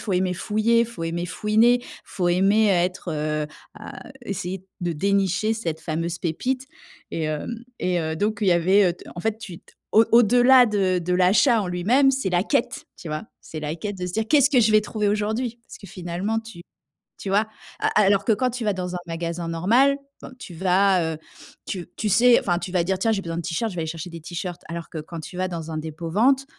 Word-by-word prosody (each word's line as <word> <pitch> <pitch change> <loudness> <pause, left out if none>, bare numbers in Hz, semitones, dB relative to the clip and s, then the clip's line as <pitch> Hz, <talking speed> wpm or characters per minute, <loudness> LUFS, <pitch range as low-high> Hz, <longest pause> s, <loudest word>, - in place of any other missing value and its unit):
faut 200 - -3
aimer 180 0 +1
fouiller, 215 +5 +1
il 235 - +3
faut 225 -8 -7
aimer 170 +1 -2
fouiner, 220 +6 +3
il - - -13 0.2
faut 175 -2 -2
aimer 195 +5 +3
être, 180 -1 0
heu, 150 -1 -2 0.3
à - - -10
essayer 190 -2 -4 0.2
de 175 -1 -1
dénicher 200 +5 +1
cette 165 -8 -4
fameuse 165 +2 -3
pépite 255 +11 -2 0.4
et, 165 - -3
hem, 155 +4 -3 0.3
et 180 -1 0
heu, 160 0 -2
donc 210 +4 -1
il 200 - +3
y - - +6
avait 180 +2 +3 0.2
en 175 - -6
fait, 220 +3 -1
tu 190 -7 -9
t - - -23 0.2
au 220 +2 +6
au-delà 245 +2 +6
de 195 -4 +1
de 180 +1 -1
l'achat 205 +6 +4
en - - -4
lui-même, 220 +11 +3
c'est 265 -6 -1
la 175 0 +2
quête, 240 +4 -1
tu 170 - -8
vois. 155 0 -3 0.2
C'est 160 - -8
la 150 0 -3
quête 205 +4 -5
de 180 - -3
se 180 - -5
dire: 220 +2 0
«Qu'est-ce 285 -2 +5
que 255 - +4
je 220 -1 +3
vais 215 0 +5
trouver 210 0 -1
aujourd'hui?» 220 +4 -1
parce - - -12
que 200 - -12
finalement, 180 +5 -3
tu 225 -6 -10 0.6
tu 195 - -5
vois? 205 +3 +2 0.5
Alors 200 -1 +4
que 225 - +3
quand 250 +4 0
tu 245 0 -5
vas 210 -2 +1
dans 180 -1 -4
un - - -3
magasin 170 0 -4
normal, 230 +12 +3 0.4
tu 180 - -9
vas, 185 -1 +2
heu, - - -11 0.5
tu 180 -3 -5
tu 215 - -1
sais 240 +4 +6
enfin 175 -2 0
tu 180 - -6
vas 180 -2 +1
dire: 190 +2 -1
«Tiens, 225 +3 +2
j'ai 205 -3 0
besoin 165 -1 -4
de - - -2
t-shirts, 180 +7 -2
je - - -9
vais 170 - -2
aller 160 - -3
chercher 165 +2 -6
des 165 -1 -9
t-shirts.» 175 +1 -6
alors 170 -1 -6
que 160 - -6
quand 165 +2 -8
tu 170 - -10
vas 185 - 0
dans 165 -3 -6
un 155 - -3
dépôt-vente, 170 - 0
190 Hz, 225 wpm, -23 LUFS, 170-220 Hz, 0.6 s, y